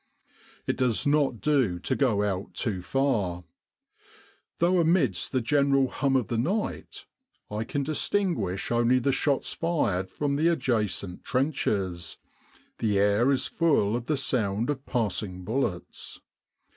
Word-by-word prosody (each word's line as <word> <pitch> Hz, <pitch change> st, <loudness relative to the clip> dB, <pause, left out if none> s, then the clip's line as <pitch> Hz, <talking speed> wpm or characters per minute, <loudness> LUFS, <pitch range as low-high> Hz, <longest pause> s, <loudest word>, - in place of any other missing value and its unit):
It -, -, -1 dB
does 125 Hz, -4 st, +1 dB
not 145 Hz, -5 st, +2 dB
do 130 Hz, -12 st, +2 dB
to -, -, -2 dB
go 115 Hz, -7 st, +2 dB
out 100 Hz, -1 st, -3 dB
too 100 Hz, -6 st, -2 dB
far. 100 Hz, -7 st, 0 dB, 1.1 s
Though 175 Hz, +2 st, +3 dB
amidst 160 Hz, -, +2 dB
the 130 Hz, -, +1 dB
general 140 Hz, +1 st, +2 dB
hum 135 Hz, 0 st, 0 dB
of 130 Hz, -4 st, +2 dB
the 115 Hz, -, -1 dB
night 195 Hz, -, -3 dB, 0.5 s
I 105 Hz, +1 st, -2 dB
can 140 Hz, +4 st, -2 dB
distinguish 155 Hz, -, -1 dB
only 120 Hz, +2 st, +3 dB
the 130 Hz, +2 st, +1 dB
shots 140 Hz, +1 st, 0 dB
fired 100 Hz, -, -1 dB
from 140 Hz, -1 st, -1 dB
the 160 Hz, +3 st, +2 dB
adjacent 110 Hz, -, -1 dB
trenches, 100 Hz, -, -1 dB, 0.6 s
the 105 Hz, -3 st, +1 dB
air 105 Hz, +5 st, +3 dB
is 135 Hz, -2 st, +2 dB
full 140 Hz, -11 st, +2 dB
of 120 Hz, 0 st, -4 dB
the 150 Hz, -, +1 dB
sound 115 Hz, -2 st, 0 dB
of 140 Hz, -1 st, -6 dB
passing 100 Hz, -5 st, -2 dB
bullets. 105 Hz, -4 st, -3 dB
125 Hz, 135 wpm, -27 LUFS, 100-140 Hz, 1.1 s, Though